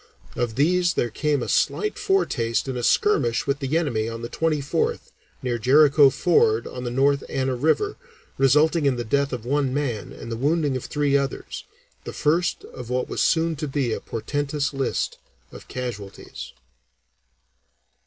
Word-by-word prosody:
Of 120 Hz, -2 st, -2 dB
these 175 Hz, +5 st, +2 dB
there 120 Hz, -, 0 dB
came 145 Hz, +2 st, 0 dB
a -, -, -5 dB
slight 425 Hz, 0 st, 0 dB
foretaste 120 Hz, -, 0 dB
in 130 Hz, -, -3 dB
a 125 Hz, -, -3 dB
skirmish 120 Hz, -, +2 dB
with 140 Hz, 0 st, -1 dB
the 140 Hz, +2 st, 0 dB
enemy 115 Hz, -9 st, -1 dB
on 115 Hz, 0 st, -7 dB
the 120 Hz, -, -5 dB
24th 165 Hz, -, -1 dB, 0.3 s
near 120 Hz, -2 st, -1 dB
Jericho 140 Hz, +3 st, +6 dB
Ford 125 Hz, -6 st, +2 dB
on 125 Hz, -, -7 dB
the 120 Hz, -, -2 dB
North 140 Hz, +3 st, +2 dB
Anna 130 Hz, -1 st, -1 dB
River, 160 Hz, -, +1 dB, 0.4 s
resulting 150 Hz, +3 st, +3 dB
in 135 Hz, -, +2 dB
the 120 Hz, -, -3 dB
death 140 Hz, +4 st, 0 dB
of 120 Hz, -3 st, -5 dB
one 140 Hz, 0 st, 0 dB
man 125 Hz, -8 st, -2 dB
and 115 Hz, -, -9 dB
the 115 Hz, -, -3 dB
wounding 145 Hz, +1 st, +1 dB
of 130 Hz, -, -4 dB
three 145 Hz, -1 st, 0 dB
others, 140 Hz, -2 st, -2 dB, 0.4 s
the -, -, -7 dB
first 165 Hz, +4 st, 0 dB
of 125 Hz, -2 st, -10 dB
what 125 Hz, 0 st, -1 dB
was -, -, -2 dB
soon 165 Hz, 0 st, +2 dB
to 150 Hz, +1 st, -3 dB
be 135 Hz, -4 st, -1 dB
a -, -, -3 dB
portentous 145 Hz, +4 st, -3 dB
list 135 Hz, -2 st, -2 dB, 0.3 s
of -, -, -12 dB
casualties. 115 Hz, -6 st, -7 dB
140 Hz, 165 wpm, -23 LUFS, 120-150 Hz, 0.4 s, Jericho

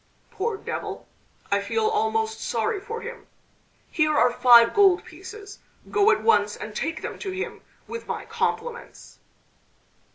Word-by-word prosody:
"Poor 420 Hz, +2 st, -2 dB
devil! -, -, -6 dB, 0.4 s
I -, -, +2 dB
feel 450 Hz, -1 st, -1 dB
almost 445 Hz, 0 st, 0 dB
sorry 435 Hz, -3 st, -1 dB
for 455 Hz, +1 st, -6 dB
him! 475 Hz, 0 st, -9 dB, 0.6 s
Here 305 Hz, -2 st, +2 dB
are 245 Hz, -, +4 dB
five 235 Hz, -2 st, +7 dB
gold 390 Hz, -3 st, +4 dB
pieces. 400 Hz, +4 st, -11 dB, 0.3 s
Go 410 Hz, +1 st, +4 dB
at 440 Hz, -, +2 dB
once 210 Hz, -, +3 dB
and 210 Hz, 0 st, -8 dB
take 325 Hz, +6 st, -3 dB
them -, -, -6 dB
to 395 Hz, -, -5 dB
him 375 Hz, +1 st, -5 dB, 0.3 s
with 460 Hz, 0 st, -7 dB
my -, -, -4 dB
compliments." 480 Hz, +1 st, -4 dB
410 Hz, 140 wpm, -25 LUFS, 325-445 Hz, 0.6 s, five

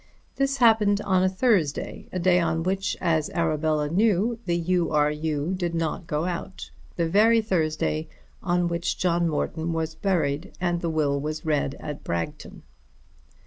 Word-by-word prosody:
This 275 Hz, 0 st, +1 dB
happened 220 Hz, -4 st, +4 dB
on 190 Hz, -2 st, +2 dB
a 185 Hz, -, +3 dB
Thursday, 185 Hz, -, 0 dB
a -, -, -3 dB
day 180 Hz, 0 st, +3 dB
on 165 Hz, -1 st, 0 dB
which, 195 Hz, +2 st, -1 dB
as 160 Hz, -3 st, +1 dB
Arabella 155 Hz, -2 st, +1 dB
knew, 210 Hz, +6 st, +1 dB
the 170 Hz, 0 st, +1 dB
U. 175 Hz, 0 st, +1 dB
R. 150 Hz, -1 st, +2 dB
U. 150 Hz, +2 st, -2 dB
did 175 Hz, -2 st, -2 dB
not 165 Hz, +1 st, -2 dB
go 150 Hz, +2 st, -1 dB
out; 180 Hz, +1 st, -5 dB, 0.2 s
the 170 Hz, -1 st, 0 dB
very 220 Hz, +6 st, +5 dB
Thursday 155 Hz, -6 st, -1 dB, 0.3 s
on 175 Hz, -1 st, +1 dB
which 170 Hz, 0 st, -2 dB
John 170 Hz, -1 st, +1 dB
Morton 160 Hz, +2 st, -2 dB
was 160 Hz, -1 st, -2 dB
buried 160 Hz, -3 st, -1 dB
and 175 Hz, -1 st, 0 dB
the 170 Hz, -, -1 dB
will 145 Hz, -3 st, +1 dB
was 155 Hz, +2 st, -4 dB
read 145 Hz, -3 st, 0 dB
at 150 Hz, -1 st, -7 dB
Bragton. 85 Hz, -1 st, -5 dB
170 Hz, 160 wpm, -25 LUFS, 155-185 Hz, 0.3 s, very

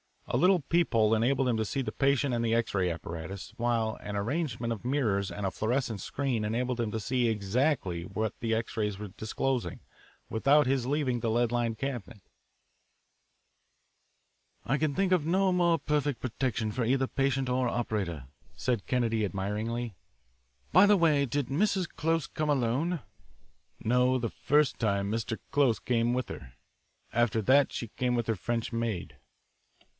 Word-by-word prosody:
A -, -, -1 dB
little 180 Hz, -1 st, +4 dB
peep 170 Hz, +3 st, +1 dB
hole 110 Hz, -1 st, +4 dB
enabled 125 Hz, +4 st, +2 dB
him 115 Hz, -, +1 dB
to 110 Hz, -, 0 dB
see 135 Hz, +6 st, -2 dB
the -, -, -3 dB
patient 140 Hz, -1 st, +1 dB
and 115 Hz, -1 st, 0 dB
the 115 Hz, 0 st, +2 dB
X 115 Hz, 0 st, 0 dB
ray 95 Hz, -2 st, +1 dB
apparatus, 85 Hz, +4 st, -6 dB
while 115 Hz, -2 st, 0 dB
an 105 Hz, -, -5 dB
arrangement 115 Hz, +1 st, -2 dB
of 115 Hz, 0 st, -5 dB
mirrors 110 Hz, -8 st, +1 dB
and 95 Hz, +3 st, -4 dB
a 95 Hz, -, 0 dB
fluorescent 115 Hz, 0 st, -1 dB
screen 125 Hz, -1 st, -2 dB
enabled 125 Hz, +3 st, -1 dB
him 115 Hz, -2 st, 0 dB
to 110 Hz, -, -3 dB
see 125 Hz, +3 st, +1 dB
exactly 105 Hz, -, 0 dB
what 110 Hz, +4 st, -2 dB
the 115 Hz, -1 st, 0 dB
X 115 Hz, 0 st, -4 dB
rays 105 Hz, -2 st, -1 dB
were 105 Hz, 0 st, -6 dB
disclosing, 115 Hz, +5 st, -2 dB, 0.5 s
without 140 Hz, +6 st, +4 dB
his 130 Hz, -1 st, 0 dB
leaving 135 Hz, -4 st, 0 dB
the 115 Hz, 0 st, -1 dB
lead 120 Hz, +1 st, +2 dB
lined 120 Hz, -2 st, 0 dB
cabinet. 120 Hz, -6 st, -5 dB, 2.4 s
"I 135 Hz, -, +1 dB
can 150 Hz, -2 st, 0 dB
think 195 Hz, -1 st, +1 dB
of 180 Hz, -5 st, +3 dB
no 190 Hz, +3 st, +2 dB
more 175 Hz, -2 st, +3 dB
perfect 145 Hz, -5 st, -1 dB
protection 115 Hz, -3 st, -1 dB
for 115 Hz, +2 st, -1 dB
either 130 Hz, +2 st, +2 dB
patient 135 Hz, -1 st, 0 dB
or 125 Hz, 0 st, +1 dB
operator," 105 Hz, -, -2 dB, 0.3 s
said 120 Hz, -5 st, -1 dB
Kennedy 115 Hz, -4 st, +1 dB
admiringly. 105 Hz, +4 st, -3 dB, 0.8 s
"By 185 Hz, +5 st, +7 dB
the 205 Hz, 0 st, +5 dB
way, 155 Hz, -5 st, +3 dB
did 140 Hz, 0 st, -1 dB
Mrs. 185 Hz, +4 st, +1 dB
Close 165 Hz, +1 st, 0 dB
come 155 Hz, -1 st, -3 dB
alone?" 145 Hz, +5 st, +1 dB, 0.8 s
"No, 125 Hz, +3 st, +3 dB
the 120 Hz, -2 st, -2 dB
first 150 Hz, +3 st, +1 dB
time 100 Hz, -3 st, 0 dB
Mr. 115 Hz, 0 st, -2 dB
Close 140 Hz, -5 st, +3 dB
came 120 Hz, 0 st, +1 dB
with 125 Hz, 0 st, -2 dB
her. 60 Hz, -, -9 dB, 0.6 s
After 115 Hz, -1 st, +2 dB
that, 135 Hz, +4 st, +4 dB
she 115 Hz, -, -4 dB
came 125 Hz, +1 st, -1 dB
with 120 Hz, -2 st, -1 dB
her 115 Hz, -, +1 dB
French 115 Hz, +3 st, -2 dB
maid." 115 Hz, -6 st, -3 dB
120 Hz, 165 wpm, -29 LUFS, 110-140 Hz, 2.4 s, By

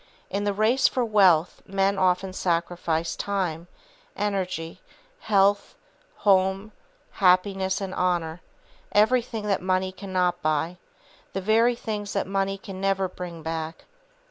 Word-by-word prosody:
In 200 Hz, +1 st, -1 dB
the 205 Hz, -, +2 dB
race 230 Hz, +6 st, +3 dB
for 250 Hz, -2 st, 0 dB
wealth 185 Hz, -6 st, +3 dB
men 195 Hz, 0 st, +1 dB
often 185 Hz, 0 st, +1 dB
sacrifice 170 Hz, -2 st, -1 dB
time, 180 Hz, -5 st, -2 dB, 0.5 s
energy, 185 Hz, -4 st, -3 dB, 0.4 s
health, 200 Hz, -1 st, +2 dB, 0.4 s
home, 195 Hz, +1 st, +2 dB, 0.4 s
happiness 190 Hz, 0 st, +2 dB
and 195 Hz, -2 st, -5 dB
honor, 175 Hz, -2 st, -1 dB, 0.5 s
everything 225 Hz, 0 st, +2 dB
that 200 Hz, -2 st, 0 dB
money 185 Hz, 0 st, 0 dB
cannot 185 Hz, -2 st, -1 dB
buy, 155 Hz, +3 st, 0 dB, 0.6 s
the 195 Hz, -, -2 dB
very 225 Hz, +4 st, +3 dB
things 210 Hz, -3 st, -4 dB
that -, -, 0 dB
money 195 Hz, 0 st, -1 dB
can 190 Hz, -1 st, -9 dB
never 195 Hz, -1 st, +1 dB
bring 175 Hz, -3 st, -8 dB
back. 160 Hz, 0 st, -5 dB
190 Hz, 120 wpm, -25 LUFS, 180-200 Hz, 0.6 s, race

